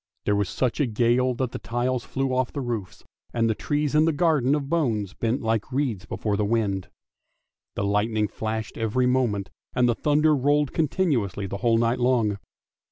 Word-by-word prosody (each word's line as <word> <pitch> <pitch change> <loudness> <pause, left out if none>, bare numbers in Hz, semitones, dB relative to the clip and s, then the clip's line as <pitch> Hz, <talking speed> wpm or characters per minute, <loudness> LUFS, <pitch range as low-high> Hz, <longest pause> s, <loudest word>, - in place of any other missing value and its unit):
There 105 - +2
was 100 -2 0
such 130 +1 -1
a 145 - +2
gale 120 +3 +2
that 125 0 -2
the - - -5
tiles 120 +1 -1
flew 135 -1 -2
off 130 0 0
the - - -3
roofs, 115 -9 -4 0.3
and 115 -1 +2
the 110 - +2
trees 145 +5 -1
in 155 +1 +5
the 165 - +3
garden 145 -4 +2
of 145 -2 -3
bones 115 - 0
bent 120 +3 -1
like 110 +2 -1
reeds 125 -8 -1
before 105 0 -2
the 105 - 0
wind. 100 -3 0 0.9
The 100 - -1
lightning 105 +2 +1
flashed 110 +1 -4
every 115 +3 +1
moment, 120 -8 0 0.2
and 125 -1 +3
the 120 - +3
thunder 150 +4 +3
rolled 145 +1 +1
continuously 145 - 0
the 100 +1 -4
whole 115 +2 +2
night 115 +2 +1
long. 120 -5 +2
120 Hz, 185 wpm, -25 LUFS, 105-135 Hz, 0.9 s, in